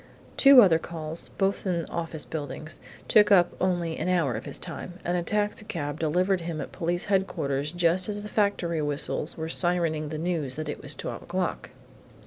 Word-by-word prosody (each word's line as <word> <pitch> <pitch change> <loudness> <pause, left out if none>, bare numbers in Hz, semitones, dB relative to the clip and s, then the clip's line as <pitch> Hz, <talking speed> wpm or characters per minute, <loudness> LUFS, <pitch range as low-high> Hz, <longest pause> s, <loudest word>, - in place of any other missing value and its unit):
Two 275 -3 +8
other 165 -5 +4
calls 160 -1 -5
both 195 0 -1
in 170 -3 -1
office 165 -2 -4
buildings 155 0 -6 0.3
took 210 -1 +5
up 175 -3 +5
only 175 -3 0
an - - -1
hour 170 -8 +1
of 110 +2 -6
his - - -3
time, 180 - -4
and 175 - 0
a 175 - 0
taxicab 190 -6 -2
delivered 180 +4 +1
him 165 -2 -4
at - - -6
Police 175 0 -2
Headquarters 150 -8 -1
just 175 +2 +3
as 205 0 -3
the - - -6
factory 200 -6 0
whistles 145 +1 0
were 160 0 -4
sirening 165 -3 +1
the 155 - -4
news 160 -5 -1
that 155 0 -5
it - - -5
was - - -5
twelve - - -5
o'clock. - - -3
170 Hz, 180 wpm, -26 LUFS, 155-185 Hz, 0.3 s, Two